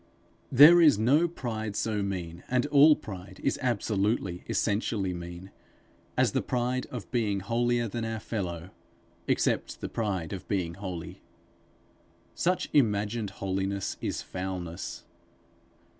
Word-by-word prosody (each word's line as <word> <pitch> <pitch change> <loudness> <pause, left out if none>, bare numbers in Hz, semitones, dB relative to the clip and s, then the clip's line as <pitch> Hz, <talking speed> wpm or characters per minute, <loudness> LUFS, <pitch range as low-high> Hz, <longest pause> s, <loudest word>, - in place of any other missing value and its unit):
There 150 +7 +9
is 150 -9 +6
no 140 +10 +4
pride 110 -10 -4
so 105 -2 -1
mean 90 -4 -4
and 125 +1 +2
all 145 +1 +7
pride 95 -7 -9
is 135 - 0
absolutely, 105 -6 0
essentially 100 -3 0
mean 85 +2 -8 0.7
as - - +3
the - - 0
pride 125 +1 -1
of 125 -5 -8
being 105 -5 0
holier 120 +3 +1
than 115 +2 -4
our 115 0 -3
fellow, 90 -5 -4 0.6
except - - 0
the - - -5
pride 95 -8 -2
of 95 - -7
being 90 -5 -1
holy. 90 -3 -7 1.1
Such 180 +1 0
imagined 105 -4 +2
holiness 95 +1 -3
is - - -3
foulness. 90 -2 -5
105 Hz, 125 wpm, -28 LUFS, 95-120 Hz, 1.1 s, There